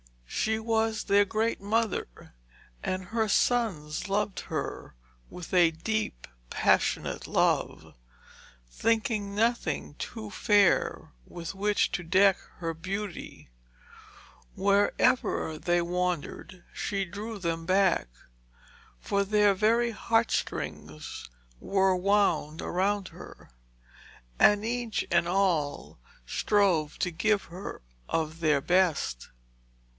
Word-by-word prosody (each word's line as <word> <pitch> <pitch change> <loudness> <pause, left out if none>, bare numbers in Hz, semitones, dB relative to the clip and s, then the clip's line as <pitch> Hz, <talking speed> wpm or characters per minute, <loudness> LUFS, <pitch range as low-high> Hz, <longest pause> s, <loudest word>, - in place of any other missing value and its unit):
She 220 - -1
was 220 -1 0
their 200 0 +4
great 220 +2 -1
mother, 210 - -2 0.5
and 185 0 -2
her 225 0 0
sons 200 -9 0
loved 205 0 0
her - - -4 0.3
with 180 0 -9
a 175 -2 +6
deep, 165 - -3 0.2
passionate - - +1
love, - - 0 0.7
thinking 215 - -1
nothing 220 - 0
too 220 -3 -6
fair 205 -1 +2 0.2
with 170 +1 -7
which 205 +1 +1
to 175 - -3
deck 190 +3 +4 0.2
her 165 -2 -3
beauty. 190 - -6 1.0
Wherever 200 -4 +2
they 175 +1 +1
wandered 180 0 -3
she 195 -1 -2
drew 210 +5 -6
them 165 -3 -3
back, 190 - +3 0.9
for 200 - 0
their 205 0 +3
very 230 +4 +2
heartstrings 220 - -2 0.3
were 190 -1 +2
wound 180 -5 +1
around 195 +1 0
her, - - -13 0.9
and 205 +1 +5
each 235 -1 -2
and 170 0 +3
all 175 - 0 0.3
strove 175 - +1
to 180 - -1
give 205 +4 +1
her 180 - -8 0.3
of 160 0 -2
their 150 -4 +2
best. 175 - +1
195 Hz, 100 wpm, -28 LUFS, 170-210 Hz, 1.0 s, a